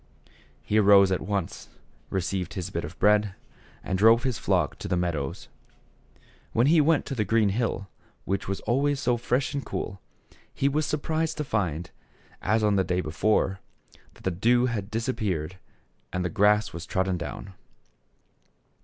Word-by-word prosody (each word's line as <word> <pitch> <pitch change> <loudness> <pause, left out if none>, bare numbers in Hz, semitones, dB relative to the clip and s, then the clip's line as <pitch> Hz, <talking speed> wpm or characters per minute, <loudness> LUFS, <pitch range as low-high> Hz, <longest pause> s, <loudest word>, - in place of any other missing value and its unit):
He 110 - +2
arose 100 -2 +6
at 95 - 0
once, 100 -3 -3 0.4
received 95 0 -2
his 95 0 -4
bit 85 - -3
of 75 +4 -8
bread, 105 -1 +3 0.5
and 95 0 -2
drove 115 +3 +6
his 130 -3 -1
flock 90 -6 0
to - - -5
the 90 - 0
meadows. 80 -6 -3 1.1
When 115 - +3
he 155 +2 +5
went 155 +1 +3
up - - -33
to - - -2
the 110 - +1
green 110 +1 +2
hill, 100 -2 -2 0.4
which 100 +1 -2
was 95 0 -3
always 140 +5 +1
so 125 -3 +1
fresh 125 +4 -1
and 140 -1 -2
cool, 100 -3 -5 0.5
he 135 - 0
was 150 +2 0
surprised 160 +2 -1
to 150 - -1
find, 90 - -2 0.5
as 110 +1 +1
on 105 -1 +3
the 95 - +3
day 90 -1 0
before, 95 +3 0 0.6
that - - -18
the 95 - 0
dew 120 +8 +3
had 105 -5 -3
disappeared 100 - -2 0.5
and 90 0 -2
the - - 0
grass 105 +1 +3
was 85 0 -7
trodden 95 -1 0
down. 95 +3 -7
105 Hz, 165 wpm, -26 LUFS, 95-120 Hz, 1.1 s, arose